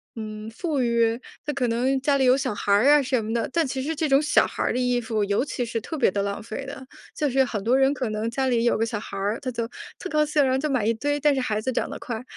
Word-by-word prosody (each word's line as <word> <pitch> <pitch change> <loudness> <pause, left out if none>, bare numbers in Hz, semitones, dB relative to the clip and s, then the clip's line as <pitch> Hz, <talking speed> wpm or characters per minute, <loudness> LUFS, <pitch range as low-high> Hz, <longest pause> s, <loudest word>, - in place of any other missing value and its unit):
嗯， 215 -1 -6
富 290 +2 -2
裕， 235 -1 +2 0.3
他 295 - -1
可 255 -3 0
能 255 +4 +1
家 285 0 +2
里 265 - +2
有 255 0 +6
小 265 -3 -1
孩 205 - -2
儿 215 +7 +4
啊 295 0 +6
什 255 -4 0
么 220 - -3
的， 235 -1 -1
但 335 +1 +2
其 260 0 -3
实 320 +3 -2
这 315 0 0
种 275 +1 +5
小 305 - +4
孩 - - -6
儿 - - +1
的 - - -1
衣 250 -1 +1
服， 220 -2 -1
尤 200 +5 +1
其 255 -4 -3
是 230 0 -3
特 320 - -5
别 270 - +4
地 200 - -1
浪 200 +1 -3
费 230 +4 -6
的， 265 -1 -9 0.3
就 300 - 0
是 265 +1 +3
很 210 -5 -4
多 240 +4 +3
人 270 0 +4
可 255 -4 -3
能 215 +2 -2
家 265 +3 -1
里 240 -2 +2
有 240 - +3
个 225 - +1
小 225 -2 -3
孩 205 - -8
儿， 205 +3 -1
他 260 - -4
就 230 -1 -3 0.3
特 - - -5
高 305 0 +3
兴， 295 -1 +2
然 260 - +2
后 260 - +2
就 305 +2 -1
买 255 -6 +1
一 230 - +3
堆， 290 +6 -1
但 295 0 +3
是 265 - 0
孩 215 -4 -1
子 260 - -1
长 - - -1
得 - - -6
快， 235 -1 -5
250 Hz, 330 characters per minute, -24 LUFS, 225-275 Hz, 0.3 s, 有